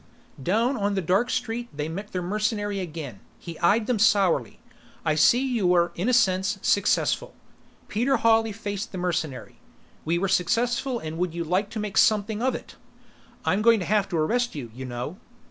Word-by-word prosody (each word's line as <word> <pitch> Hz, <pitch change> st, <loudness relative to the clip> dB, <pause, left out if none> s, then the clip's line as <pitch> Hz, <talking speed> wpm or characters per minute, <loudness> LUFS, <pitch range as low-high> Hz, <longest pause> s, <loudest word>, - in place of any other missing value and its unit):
Down 230 Hz, -, +1 dB
on 200 Hz, -1 st, 0 dB
the 190 Hz, -, 0 dB
dark 195 Hz, +9 st, +2 dB
street, 240 Hz, +1 st, -3 dB
they 150 Hz, +1 st, -4 dB
met 195 Hz, +6 st, -6 dB
their 180 Hz, -1 st, -3 dB
mercenary 205 Hz, +1 st, -1 dB
again. 155 Hz, -, -6 dB, 0.2 s
He 170 Hz, -2 st, -9 dB
eyed 210 Hz, +5 st, +3 dB
them 235 Hz, -2 st, 0 dB
sourly. 190 Hz, -, +2 dB, 0.5 s
"I 155 Hz, -, +2 dB
see 235 Hz, -, +4 dB
you 235 Hz, -8 st, 0 dB
were, 175 Hz, -1 st, +3 dB
in 190 Hz, +8 st, -1 dB
a -, -, +3 dB
sense, 190 Hz, -4 st, +2 dB
successful." -, -, +1 dB, 0.5 s
Peter 245 Hz, +5 st, +1 dB
Hawley 225 Hz, -1 st, +3 dB
faced 205 Hz, 0 st, -5 dB
the -, -, -4 dB
mercenary. 170 Hz, -6 st, -3 dB, 0.4 s
"We 165 Hz, +2 st, 0 dB
were 195 Hz, +3 st, 0 dB
successful 240 Hz, +7 st, +1 dB
and 160 Hz, -5 st, -6 dB
would 175 Hz, -2 st, -1 dB
you 170 Hz, -, -2 dB
like 185 Hz, +5 st, 0 dB
to 220 Hz, -, -5 dB
make 210 Hz, -2 st, -4 dB
something 215 Hz, 0 st, +2 dB
of 260 Hz, +1 st, +1 dB
it?" -, -, -9 dB, 0.7 s
"I'm 195 Hz, +3 st, +2 dB
going 230 Hz, 0 st, +5 dB
to 180 Hz, -, -3 dB
have 205 Hz, -1 st, +1 dB
to 175 Hz, -, -1 dB
arrest 240 Hz, +9 st, 0 dB
you, 125 Hz, -6 st, -6 dB
you 130 Hz, +2 st, -7 dB
know." 125 Hz, +7 st, -5 dB
200 Hz, 185 wpm, -25 LUFS, 170-225 Hz, 0.7 s, going